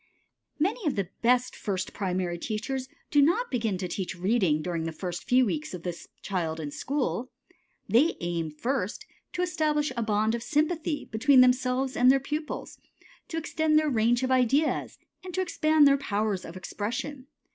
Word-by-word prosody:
Many 375 +5 0
of 290 - +1
the 195 -3 -2
best 250 +1 +2
first 190 -2 -3
primary 180 -3 -2
teachers 255 +6 -3 0.2
do 290 - +5
not 355 - +2
begin 225 -6 0
to 180 0 -3
teach 185 +1 -4
reading 185 -5 +2
during 170 -2 -2
the 165 - -2
first 175 +2 -5
few 255 +1 +4
weeks 160 -4 -3
of 170 - -9
the 175 - -2 0.3
child 165 -4 -2
in 150 -2 -4
school. 260 - -2 0.6
They 285 +9 +4
aim, 170 -2 -2
first, 235 - -3 0.3
to 360 - 0
establish 305 -4 0
a 235 - -1
bond 215 0 +1
of 235 - -2
sympathy 305 +3 0
between 255 +4 +5
themselves 255 +1 +2
and 250 +1 +5
their 270 - +4
pupils, 300 +3 -5 0.5
to 325 - -5
extend 315 -1 +1
their 305 -1 +2
range 240 +1 +2
of 260 - 0
ideas, 260 +4 +2 0.3
and 365 -2 -7
to 375 - +1
expand 310 -4 +4
their 280 0 +5
powers 210 -7 -1
of 170 - -8
expression. 245 +9 -4
245 Hz, 170 wpm, -27 LUFS, 190-295 Hz, 0.6 s, do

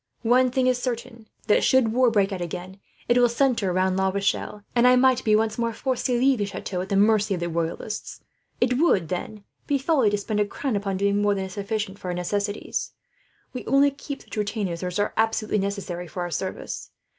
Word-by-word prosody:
One 250 +2 +4
thing 255 +1 +1
is 250 -1 +2
certain, 235 -2 -5 0.2
that 210 - +3
should 250 -4 +3
war 250 0 +4
break 205 -3 +2
out 185 - -4
again, 180 +3 -6 0.3
it 240 +1 +4
will 245 -1 +5
centre 235 -5 +1
round 185 +1 +1
La 190 0 +2
Rochelle; 200 +1 -2
and 240 +1 +5
I 250 - +7
might 255 0 +4
be 215 -1 +4
once 220 +1 0
more 230 0 0
forced 260 +1 -2
to 250 -2 +1
leave 265 -1 +3
the 205 - +1
chateau 190 -2 -4
at 190 - -6
the 200 - 0
mercy 210 0 +3
of - - -5
the 170 0 -2
Royalists. 170 +6 -4 0.4
It 250 +1 +2
would, 200 - +3
then, 200 +3 -5 0.2
be 285 - +2
folly 270 -5 +2
to 205 - 0
spend 210 +1 -2
a 210 - +3
crown 260 +3 -3
upon 195 -1 -1
doing 200 +1 +1
more 205 0 +2
than 190 -1 -2
is 190 - -9
sufficient 200 0 -3
for - - -8
our 180 - -2
necessities. 205 +3 -2 0.6
We 255 - -5
only 280 +1 +4
keep 280 0 -8
such - - -10
retainers 205 -5 -2
as 180 -1 -3
are 205 0 0
absolutely 220 -1 +1
necessary 195 -3 -3
for 180 +3 -6
our 175 - -5
service. 185 +4 -4
210 Hz, 220 wpm, -24 LUFS, 190-245 Hz, 0.6 s, I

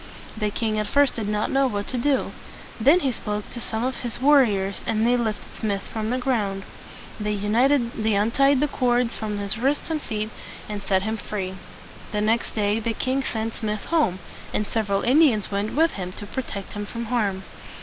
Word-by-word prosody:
The 210 -1 0
king 215 0 -1
at 210 - -1
first 285 -1 +4
did 220 -3 -3
not 210 0 0
know 270 0 +3
what 205 -4 -2
to 255 - -2
do. 275 +2 +1 0.5
Then 290 +11 +5
he 270 - +1
spoke 210 -2 -4
to 240 - -5
some 220 0 -2
of 260 +1 -2
his 240 -2 -3
war 285 +2 +7
riors, 195 -4 -1
and 225 0 +2
they 245 +1 +4
lifted 225 -3 -2
Smith 200 -3 -2
from 220 -1 -4
the 250 - +1
ground. 210 -7 0 0.6
They 210 0 -1
untied 230 +3 +2
the 295 - +3
cords 245 -3 +1
from 210 -1 -3
his 200 +1 -2
wrists 280 +6 0
and 310 -2 -1
feet, 215 -2 -3 0.4
and 210 -1 -4
set 190 -1 +1
him 220 +2 -1
free. 195 -3 -4 0.6
The 210 - +1
next 225 +2 +1
day 210 0 +1
the 225 +1 -1
king 260 +4 0
sent 225 -2 -2
Smith 215 -2 -3
home; 300 - +2 0.3
and 210 - 0
several 200 -2 0
Indians 255 -7 +4
went 200 +3 -1
with 325 +2 +4
him 185 -2 -5
to 205 - -8
protect 205 -3 -5
him 205 0 -4
from 235 +1 -5
harm. 210 -5 0
220 Hz, 195 wpm, -24 LUFS, 210-250 Hz, 0.6 s, war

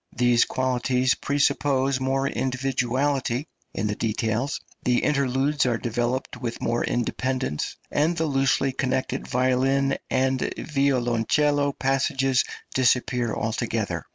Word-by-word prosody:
These 120 -1 +4
qualities 130 0 +1
presuppose 140 -2 +1
more 135 +1 0
individuality 130 0 -1 0.3
in 100 - -3
the 105 - 0
details, 115 +4 -1 0.2
the 125 -1 +1
interludes 140 0 +1
are 120 -2 +1
developed 120 +3 -2
with 120 -2 -4
more 120 +1 0
independence, 130 - -2 0.2
and 160 +4 +1
the 160 - +1
loosely 135 -1 +2
connected 130 0 -2
violin 130 +2 +1
and 130 0 +1
violoncello 140 +1 +1
passages 135 -1 +1 0.3
disappear 125 -2 +1
altogether. 110 0 -2
130 Hz, 105 wpm, -25 LUFS, 120-135 Hz, 0.3 s, These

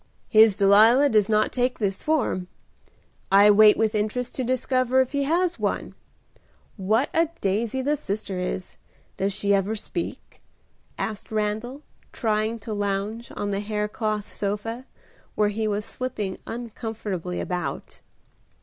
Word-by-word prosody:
"His 220 -3 +6
Delilah 220 +8 +6
does 215 -3 +3
not 215 0 +2
take 250 0 0
this 195 -3 -2
form. 255 -12 0 0.8
I 200 +2 +7
wait 210 +1 +7
with 220 -1 +1
interest 215 +4 -2
to 260 - -2
discover 255 +1 +1
if 260 -1 +2
he 280 -1 0
has 340 +3 +1
one. - - -2 0.8
What 215 +7 +1
a 330 -1 +2
daisy 220 +6 -1
the 295 +3 +1
sister 205 -8 -4
is. 180 0 -4 0.4
Does 195 +1 0
she 200 +1 +1
ever 200 +2 +1
speak?" 210 - -6 0.6
asked 215 -1 -5
Randal, 220 +6 -2 0.3
trying 220 0 -1
to 215 +1 -5
lounge 205 +3 -3
on 205 0 -2
the 195 - -1
haircloth 210 0 -2
sofa, 210 +5 -3 0.5
where 210 -1 +2
he 215 +1 -2
was 210 0 -1
slipping 210 -7 -4
uncomfortably 220 -6 -5
about. 180 -2 -4
215 Hz, 135 wpm, -24 LUFS, 205-245 Hz, 0.8 s, I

